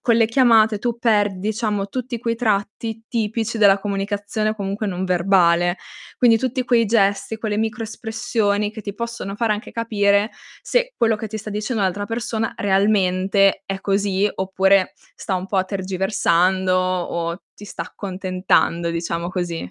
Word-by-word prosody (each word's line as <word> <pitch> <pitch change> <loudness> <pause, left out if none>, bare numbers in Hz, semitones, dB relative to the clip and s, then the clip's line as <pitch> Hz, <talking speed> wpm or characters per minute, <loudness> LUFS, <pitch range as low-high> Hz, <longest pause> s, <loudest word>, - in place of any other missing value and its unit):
con 235 -2 +2
le 230 - +5
chiamate 225 -3 +4
tu 235 +1 -2
perdi, 205 -4 +1
diciamo, 210 -2 -1
tutti 250 -2 -4
quei 230 0 -1
tratti 220 0 -2
tipici 225 0 -2
della 200 -2 +6
comunicazione, 205 +2 -2
comunque, 200 +1 -3
non 185 -1 -2
verbale. 175 -1 +3 0.4
Quindi 230 -2 +5
tutti 255 +1 -2
quei 235 -2 +3
gesti, 205 0 +1
quelle 215 -1 -2
micro-espressioni 220 -2 -1
che 220 - -8
ti 200 -1 -6
possono 230 -3 -5
fare 225 -1 +1
anche 210 +1 -5
capire 205 -2 +1 0.3
se - - 0
quello 225 -2 +2
che 220 +1 -5
ti 220 - -5
sta 215 0 -7
dicendo 210 +1 -2
l'altra 200 +2 -1
persona 225 0 -3
realmente 195 -1 +2
è 195 0 -4
così, 200 0 +1
oppure 190 0 +2 0.2
sta 190 - -3
un 185 0 -3
po' 195 -1 +1
tergiversando 190 -1 +1
o 175 -2 -1 0.2
ti 205 - -12
sta 165 - -5
accontentando, 185 -2 -1
diciamo 170 0 -3
così. 175 - -4
205 Hz, 150 wpm, -21 LUFS, 190-225 Hz, 0.4 s, della